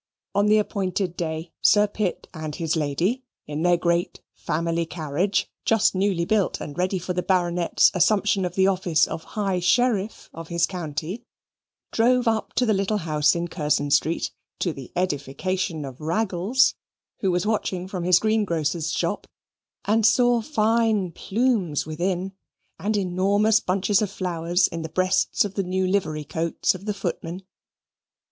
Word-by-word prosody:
On 205 +1 +2
the 215 +1 +5
appointed 190 -3 -1
day, 160 -1 -4
Sir 210 0 +5
Pitt 205 -3 -3
and 155 -2 -5
his 165 -1 -1
lady, 165 - 0 0.2
in 150 +1 -4
their 175 0 +4
great 170 0 0
family 165 +1 -1
carriage 165 +4 -1 0.2
(just 225 -2 +3
newly 190 -3 +1
built, 210 0 +1
and 145 - -7
ready 185 +3 0
for 180 +1 -3
the 180 - -1
Baronet's 175 -2 +2
assumption 195 +2 +2
of 180 -1 -3
the 190 - +4
office 180 -4 +2
of 160 - -6
High 195 -3 0
Sheriff 215 +2 +1
of 165 0 -8
his 170 0 +1
county), 175 - -5 0.7
drove 245 +2 +3
up 225 -1 0
to 250 - +2
the 220 - +3
little 195 +2 0
house 155 -4 +2
in 170 0 -2
Curzon 150 -4 -1
Street, 155 +4 +1 0.3
to 175 - -1
the 135 -4 -10
edification 170 +1 -2
of 135 +1 -9
Raggles, 190 +8 +2 0.5
who 195 - 0
was 180 +1 0
watching 190 -4 -1
from 185 -2 -4
his 180 0 +5
greengrocer's 170 -7 0
shop, - - -2 0.6
and 220 +2 +2
saw 245 +1 +4
fine 220 - +1
plumes 200 - 0
within, 180 +4 -2 0.5
and 210 +2 0
enormous 200 +3 +2
bunches 195 +2 +1
of 210 - 0
flowers 175 -1 0
in 165 - -6
the 160 - -5
breasts 185 +5 +1
of 200 - -5
the 200 - -1
new 185 +1 -1
livery 185 -6 0
coats 165 +3 0
of 185 +1 -10
the 210 - -1
footmen. 180 -1 -4
185 Hz, 155 wpm, -24 LUFS, 165-205 Hz, 0.7 s, the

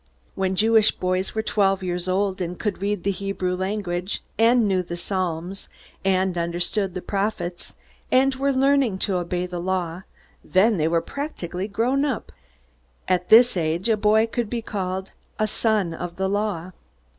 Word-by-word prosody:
When 190 -1 -1
Jewish 220 +1 +5
boys 185 +2 -1
were 220 - 0
twelve 195 -3 +1
years 180 0 -2
old, 190 0 0
and 175 0 -3
could 205 -3 -3
read 200 -3 -1
the 200 - +1
Hebrew 195 -2 -2
language, 185 -1 -2
and 230 0 +4
knew 190 -2 +2
the 175 -1 -6
psalms, 180 0 -3 0.3
and 190 -1 +1
understood 175 +3 -1
the 185 - -4
prophets, 195 -4 -3 0.4
and 265 +1 +4
were 275 +2 0
learning 270 -5 +3
to 195 -3 0
obey 175 0 -2
the 175 -1 -5
Law 180 -1 -2 0.4
then 205 +3 +3
they 155 -1 +2
were 165 0 +2
practically 195 - -5
grown 245 +7 +1
up. 270 -6 -2 0.8
At 180 -1 0
this 240 +1 +7
age 170 +4 0
a 225 - +4
boy 215 +1 +4
could 230 -1 -3
be 235 -1 -3
called 190 -2 -3 0.3
"a 215 - +2
son 215 -4 0
of 175 +1 -6
the 190 +2 -1
Law." 200 -3 -2
190 Hz, 165 wpm, -24 LUFS, 180-215 Hz, 0.8 s, this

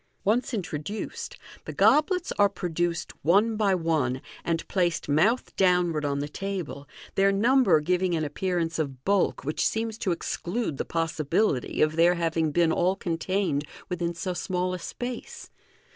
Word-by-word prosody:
Once 225 +5 +1
introduced, 195 - -5 0.3
the - - -5
goblets 305 - +3
are 205 0 +6
produced 175 -2 -2
one 205 +8 +4
by 205 -3 +2
one, 155 -7 0 0.2
and 165 -1 -2
placed 175 -3 0
mouth 185 - +2
downward 180 -4 +2
on 140 -1 0
the 145 +1 -2
table, 175 -5 -5 0.3
their 195 0 +4
number 215 - +4
giving 180 +3 +1
an 160 - -1
appear 180 +5 -2
ance 165 -1 -1
of 135 -4 -4
bulk 200 -1 +1
which 150 - -1
seems 225 0 -2
to 195 - 0
exclude 175 - -2
the - - -2
possibility 165 - 0
of 155 +1 0
their 175 +2 +5
having 165 -2 0
been 170 +1 +3
all 180 +3 +2
contained 175 -3 -1 0.3
within 170 -1 -2
so 180 +1 -3
small 180 0 -2
a 180 - -4
space. 245 +7 -6
175 Hz, 155 wpm, -27 LUFS, 160-200 Hz, 0.3 s, are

